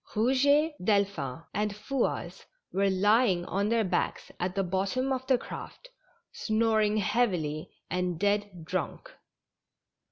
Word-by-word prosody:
Rouget, 285 +7 +3
Delphin 190 -9 0
and 210 0 -1
Fouasse 260 +4 -2 0.3
were 195 +1 +2
lying 195 -1 +3
on 200 +2 0
their 230 -1 +2
backs 180 -3 -1
at 180 +1 -2
the 195 - +1
bottom 195 +9 0
of 260 0 -4
the 260 - +4
craft, - - -9 0.4
snoring 215 -1 +1
heavily, 180 -9 0 0.2
and 180 -2 -2
dead 205 -4 0
drunk. 185 - -4
205 Hz, 120 wpm, -29 LUFS, 185-235 Hz, 0.4 s, the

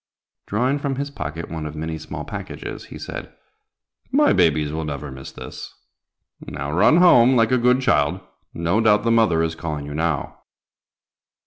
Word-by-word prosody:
Drawing 125 +7 0
from 140 -1 -2
his 140 +1 -4
pocket 80 - -5
one 80 -2 -4
of 75 - -8
many 80 +1 -4
small 80 - -7
packages, - - -7
he - - -10
said, - - -7 0.8
"My 295 +3 +4
babies 80 -4 +2
will 80 0 -3
never 75 -2 -5
miss 65 0 -9
this. - - -9 0.7
Now 70 +1 -5
run 100 - +4
home, 130 -8 +6
like 115 -1 +3
a 130 - +4
good 125 +2 +3
child; 85 - +2 0.3
no 85 +6 0
doubt 105 -2 +4
the 115 - +2
mother 110 -8 +3
is 80 0 -1
calling 75 -3 -5
you 75 - -7
now." 80 -2 -2
85 Hz, 165 wpm, -22 LUFS, 75-120 Hz, 0.8 s, home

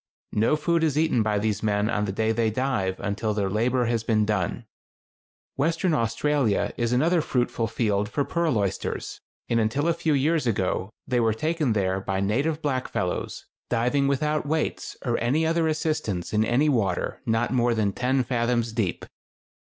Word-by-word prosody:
No 115 +8 +3
food 165 +2 +1
is 150 -3 +1
eaten 155 -7 +2
by 105 -1 +1
these 105 -1 -1
men 105 -1 +1
on 105 -2 0
the 100 - -2
day 110 +3 0
they 115 0 +1
dive 110 -6 -1
until 105 +2 -2
their 100 -2 0
labor 120 +4 +1
has 115 -1 0
been 110 -2 +2
done. 105 -4 -1 0.9
Western 165 +4 +1
Australia 135 -2 +1
is 120 -1 -1
another 160 +7 +3
fruitful 120 -5 -1
field 105 -3 0
for 140 +3 -1
pearl 170 -7 0
oysters, 100 -3 -3 0.3
and 115 - +1
until 115 +8 0
a 170 - +3
few 160 -1 0
years 150 0 +1
ago 95 -3 0 0.2
they 125 -1 +1
were 115 -2 +2
taken 155 -1 0
there 95 -2 0
by 95 0 -2
native 140 +11 0
blackfellows, 130 -10 -2 0.3
diving 125 +4 +1
without 150 +2 0
weights 155 +1 -2
or 120 -2 0
any 140 +7 +1
other 165 0 +2
assistance 155 - -2
in 105 0 +3
any 125 +7 +2
water 105 -11 0
not 115 +2 +1
more 120 -2 +2
than 105 -3 0
ten 130 +3 +1
fathoms 120 -1 0
deep. 110 -6 -2
120 Hz, 170 wpm, -25 LUFS, 105-145 Hz, 0.9 s, No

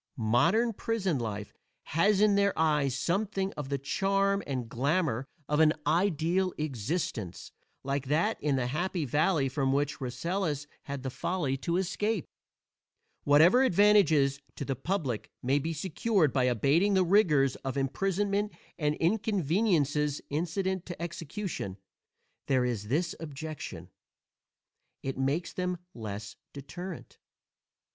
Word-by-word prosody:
Modern 170 - +3
prison 195 - -1
life 105 -3 -4 0.3
has 195 +5 +2
in 210 -1 +5
their 200 0 +2
eyes 150 -4 +2
something 195 +5 -1
of 145 -3 -6
the 140 - 0
charm 195 +8 +1
and 130 -4 -3
glamor 135 +1 0 0.2
of 150 +1 +1
an 155 -1 +6
ideal 175 +2 +1
existence, 140 - -3 0.3
like 140 0 -2
that 170 +10 +1
in 145 -1 +1
the 130 -2 0
Happy 170 +5 -1
Valley 150 +2 +2
from 135 0 0
which 145 +1 0
Rasselas 145 +4 -2 0.2
had 140 -2 -5
the 130 - -3
folly 150 -3 -1
to 170 +5 -1
escape. 195 +1 -1 1.0
Whatever 160 - +6
advantages 180 - +4 0.2
to 140 - -4
the 135 - -1
public 135 - -2
may 135 +3 +2
be 160 +4 -2
secured 175 - +1
by 130 -2 +2
abating 140 - +3
the 185 -1 +4
rigors 155 -9 +4
of 135 0 -4
imprisonment 195 +9 0 0.3
and 150 -1 +1
inconveniences 165 -6 +1
incident 180 +4 -1
to 175 - -7
execution, 170 - -5 0.7
there 130 -2 +2
is 110 -4 -2
this 155 +9 0
objection: 145 - -7 1.1
it 135 -1 -3
makes 140 +6 0
them 180 -1 -2 0.2
less 105 -2 -6 0.2
deterrent. 165 +5 -8
155 Hz, 125 wpm, -29 LUFS, 135-190 Hz, 1.1 s, an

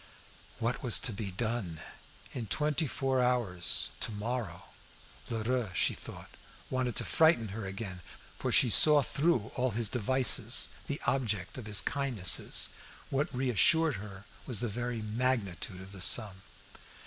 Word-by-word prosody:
What 115 +2 -2
was 120 -4 +5
to 115 - -1
be 100 0 -5
done? 105 -5 -4 0.5
In 120 -4 -6
twenty 150 - 0
four 135 0 -1
hours 120 -9 +1
tomorrow. 110 -3 -4 0.7
Lheureux, 115 0 -2
she - - +2
thought, - - -11 0.4
wanted 130 -2 -2
to - - -2
frighten 160 -9 +2
her 100 0 -6
again; 95 -2 -7 0.4
for - - -2
she 125 - +4
saw 150 +4 +8
through 140 -8 -1
all 130 0 -1
his 115 -3 0
devices, 130 +2 +2 0.2
the - - -4
object 105 -8 -1
of 110 - -9
his 105 -2 +3
kindnesses. 130 -10 +3 0.4
What 140 +2 -1
reassured 135 - +2
her 100 -1 -10 0.2
was 120 -5 0
the 120 - -2
very 120 +1 -4
magnitude 105 -6 -2
of 95 +1 -12
the 95 -2 -10
sum. 95 -1 +2
115 Hz, 140 wpm, -30 LUFS, 100-130 Hz, 0.7 s, saw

